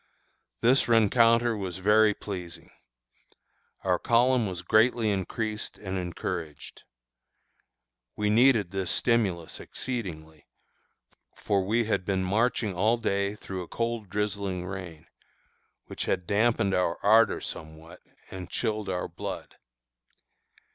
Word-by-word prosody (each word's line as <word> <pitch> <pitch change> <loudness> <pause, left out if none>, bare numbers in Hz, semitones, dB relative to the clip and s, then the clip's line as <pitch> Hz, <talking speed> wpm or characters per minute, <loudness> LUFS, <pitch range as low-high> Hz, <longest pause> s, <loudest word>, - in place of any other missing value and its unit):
This 125 +4 +4
rencounter 115 +1 +4
was 95 -3 -5
very 105 +2 +4
pleasing. 90 -4 -8 1.1
Our 90 -2 +1
column 120 -1 +3
was 90 -2 -5
greatly 110 +3 +3
increased 105 +3 -3
and 95 -2 -5
encouraged. 85 -3 -6 1.3
We 105 0 0
needed 115 -5 +4
this 95 -2 -2
stimulus 95 -9 0
exceedingly, 80 - -6 0.9
for 100 -2 0
we 110 +4 +1
had 110 -3 0
been 95 0 -1
marching 110 +2 0
all 110 +6 +2
day 100 -2 -1
through 95 -3 -6
a 90 - -8
cold 115 -3 -3
drizzling 100 -2 -2
rain, 90 -4 -7 0.8
which - - -5
had 90 -2 -1
dampened 105 -1 +2
our 90 -2 +1
ardor 110 +2 +5
somewhat, 80 +3 -9 0.3
and 95 -2 -7
chilled 110 -3 -2
our 90 -1 -2
blood. - - -7
100 Hz, 115 wpm, -27 LUFS, 90-115 Hz, 1.3 s, ardor